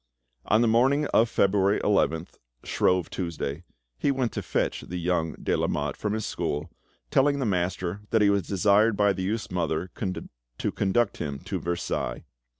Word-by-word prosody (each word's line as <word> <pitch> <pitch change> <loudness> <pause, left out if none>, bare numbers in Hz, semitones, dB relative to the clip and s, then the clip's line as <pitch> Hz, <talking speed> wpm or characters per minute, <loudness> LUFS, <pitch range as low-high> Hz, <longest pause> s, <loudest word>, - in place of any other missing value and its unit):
On 110 +2 +3
the 120 - +4
morning 130 +6 +3
of 115 +1 +4
February 100 0 +3
11th, 85 -5 0 0.2
Shrove 90 -2 +1
Tuesday, 85 -3 -4 0.4
he - - +1
went 130 -4 0
to - - -3
fetch - - -1
the 90 - -6
young 85 -2 0
de - - -1
Lamotte 75 0 -1
from 105 -1 -2
his 110 -1 -2
school, 75 - -3 0.4
telling 140 +1 +3
the 135 - -1
master 90 -1 -1
that 110 -2 +3
he 100 - +5
was 100 0 +2
desired 100 +2 +3
by 100 -1 +4
the 95 - -5
youth's 110 +4 -2
mother 85 0 -1 0.7
to - - -1
conduct 100 +3 +1
him 70 -2 -3
to - - -4
Versailles. 85 -8 -3
100 Hz, 165 wpm, -26 LUFS, 85-110 Hz, 0.7 s, he